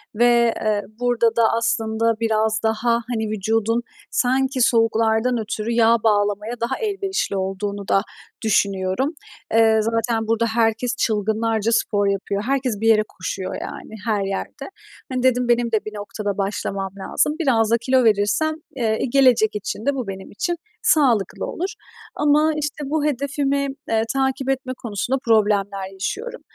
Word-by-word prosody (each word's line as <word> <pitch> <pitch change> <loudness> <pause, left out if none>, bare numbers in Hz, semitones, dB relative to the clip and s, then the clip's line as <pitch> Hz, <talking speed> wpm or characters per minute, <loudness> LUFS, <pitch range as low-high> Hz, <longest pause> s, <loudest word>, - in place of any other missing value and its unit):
ve, 235 0 +4
eee, 215 -1 +1 0.2
burada 235 -2 +2
da 235 - +3
aslında 230 0 +1
biraz 220 -1 +1
daha, 225 +2 +1 0.2
hani, 220 -3 -2
vücudun 225 +2 0 0.3
sanki 260 +1 +1
soğuklardan 225 +1 +2
ötürü 220 +1 -3
yağ 230 0 +4
bağlamaya 210 +1 +1
daha 240 +3 -1
elverişli 390 - -2
olduğunu 200 +1 -3
da 195 - +3 0.4
düşünüyorum. 200 - +1 0.4
Eee, 225 -1 +5
zaten 225 0 -1
burada 225 +1 +1
herkes 230 +2 +1
çılgınlarca 220 0 0
spor 205 -3 +1
yapıyor, 200 +1 -1
herkes 255 -5 -1
bir 225 - +1
yere 215 -1 +5
koşuyor, 185 0 -5
yani, 220 - -8
her 210 -3 +1
yerde. 195 - -5 0.4
Hani, 255 -1 -1
dedim 250 -1 +2
benim 240 -1 +2
de 220 -2 0
bir 215 - -6
noktada 205 -1 -4
başlamam 195 -1 -2
lazım. 295 +9 0
Biraz 230 -8 +2
da 235 - +5
kilo 255 +2 +2
verirsem, 220 +9 +2 0.2
eee, 220 -4 0
gelecek 255 -6 +4
için 210 +2 -4
de 280 0 +1
bu 255 -5 -4
benim 190 -1 -7
için 345 +11 -2 0.3
sağlıklı 240 - +2
olur 370 +3 -3 0.5
ama, 300 +2 +3
işte, 295 -1 -4
bu 305 0 0
hedefimi, 280 0 0 0.2
eee, 225 0 +2
takip 265 0 0
etme 265 -1 -1
konusunda 235 +4 -2
problemler 200 -3 +1
yaşıyorum. 445 - -4
225 Hz, 145 wpm, -21 LUFS, 210-255 Hz, 0.5 s, Eee